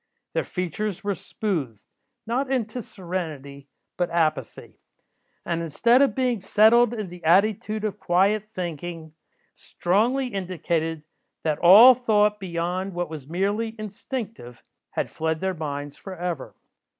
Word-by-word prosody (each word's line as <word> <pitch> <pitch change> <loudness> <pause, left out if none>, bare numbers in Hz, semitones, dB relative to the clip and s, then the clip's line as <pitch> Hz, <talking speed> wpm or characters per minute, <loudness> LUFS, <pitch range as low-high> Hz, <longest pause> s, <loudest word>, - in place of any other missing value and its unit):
Their - - 0
features 185 +3 -3
were 200 0 0
smoothed, 165 - -4 0.4
not 255 +4 -1
into 245 -1 -1
serenity, 155 -9 -6 0.3
but 175 -1 0
apathy; 160 -2 -2 0.7
and, 170 -1 -1
instead 235 - +3
of 280 - +3
being 250 -4 +1
settled 220 +4 +5
in 210 -5 -4
the 175 0 -12
attitude 210 +5 +2
of 210 -1 -3
quiet 195 +4 +2
thinking, 170 -5 -6 0.4
strongly 240 +9 0
indicated, 170 -5 -2 0.4
that 155 -2 0
all 210 +9 +9
thought 210 -4 +2
beyond 180 +1 -3
what 175 -2 -3
was 150 -3 -8
merely 205 +6 -1
instinctive, 215 - -7 0.3
had - - -2
fled 160 0 -2
their 190 +1 -1
minds 145 -3 -5
for 190 -1 -8
ever. 175 -5 -4
185 Hz, 125 wpm, -24 LUFS, 165-215 Hz, 0.7 s, all